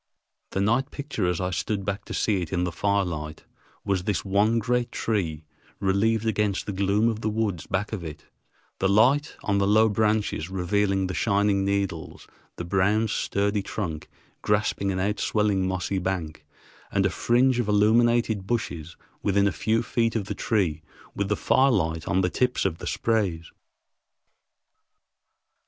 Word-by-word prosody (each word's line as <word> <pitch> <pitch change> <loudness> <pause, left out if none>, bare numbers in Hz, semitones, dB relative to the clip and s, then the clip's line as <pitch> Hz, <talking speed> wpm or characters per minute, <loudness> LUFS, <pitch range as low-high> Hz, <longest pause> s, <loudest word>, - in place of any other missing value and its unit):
The 95 - -2
night 115 +7 +1
picture 140 -11 -3
as 90 -2 0
I 90 0 -1
stood 95 +4 -2
back 100 0 -3
to - - -7
see 100 -4 +1
it 85 - -5
in 90 -2 0
the 90 - -1
firelight 85 -5 -2 0.4
was 95 -2 0
this 105 - -1
one 105 +4 +2
great 120 +1 0
tree, 80 -8 -2 0.3
relieved 100 +3 +1
against 105 -3 0
the - - -3
gloom 100 +3 +2
of 110 -1 -1
the 110 - 0
woods 105 -6 -2
back 100 +3 -2
of 100 -5 -4
it, 80 -3 -8 0.5
the 95 - +2
light 130 +9 +3
on 100 -1 +1
the 100 - +2
low 110 +2 +5
branches 105 -5 0
revealing 95 +1 0
the 95 - -3
shining 100 -2 +2
needles, 100 -4 -2 0.3
the 85 - -5
brown, 100 +5 +2
sturdy 100 +1 0
trunk 85 -6 -5 0.3
grasping 105 -1 0
an 95 - -2
outswelling 100 0 0
mossy 95 +1 -1
bank, 80 -5 -4 0.4
and - - +1
a - - +2
fringe 125 +1 +2
of 120 - 0
illuminated 110 0 +3
bushes 85 -9 -3 0.2
within 100 0 +2
a - - +1
few 110 +4 0
feet 115 +1 0
of 105 -4 -1
the - - -4
tree 90 -9 0 0.3
with 100 -1 -2
the 105 - +1
firelight 90 -12 +2
on 95 +2 +2
the 90 - +1
tips 125 -4 0
of 85 -4 -1
the - - -6
sprays. 95 -8 -1
100 Hz, 160 wpm, -25 LUFS, 95-110 Hz, 0.5 s, low